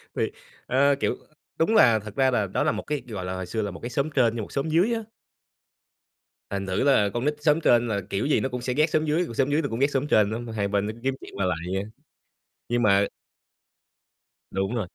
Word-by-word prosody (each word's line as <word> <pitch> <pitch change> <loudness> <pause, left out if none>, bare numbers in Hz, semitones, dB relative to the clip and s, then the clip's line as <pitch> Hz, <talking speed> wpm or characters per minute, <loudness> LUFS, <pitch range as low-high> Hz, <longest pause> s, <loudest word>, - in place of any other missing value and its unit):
Thì, - - 0 0.3
ơ, 140 +2 +3
kiểu, - - 0 0.4
đúng 215 +8 +2
là 115 - +6
thật 105 0 -10
ra 130 -1 +3
là 105 -4 +1
đó 95 - -1
là - - +2
một 110 - -4
cái, 150 -3 -3
gọi 100 -5 -5
là, 90 0 -3
hồi 95 0 -4
xưa 110 +5 -3
là 105 -2 -3
một - - -9
cái 120 - -5
xóm 140 +5 -1
trên 120 -4 +4
với 115 - -3
một 105 - -8
xóm 140 +3 -2
dưới 180 +9 +3
á. 225 - -1 1.5
Thành 100 -1 -3
thử 95 +5 0
là 130 -8 +4
con 120 +2 -2
nít 150 0 +1
xóm 150 +1 +3
trên 120 -5 +4
là 100 -3 -1
kiểu 100 - -1
gì 145 - +3
nó 135 - -1
cũng 125 0 -4
sẽ 125 0 -2
ghét 155 +4 +2
xóm 155 0 +1
dưới, 160 +4 +1
còn 115 - -8
xóm 135 +4 +1
dưới 150 - +2
nó 140 - -3
cũng 115 +2 -4
ghét 140 +1 +3
xóm 140 +1 0
trên 105 -6 +4
nữa, 110 - -3
mà 120 -2 -7
hai 100 -2 -1
bên 100 0 0
nó - - -2
cứ 115 - -15
kiếm 135 0 0
chuyện - - -11
qua 100 - -1
lại 90 -2 0 0.2
vậy 95 - 0
á. 105 - -8 0.8
Nhưng 120 0 +1
mà 100 -1 +4 1.5
Đúng 95 +4 -1
rồi. 105 -6 -2
120 Hz, 265 wpm, -25 LUFS, 100-140 Hz, 1.5 s, là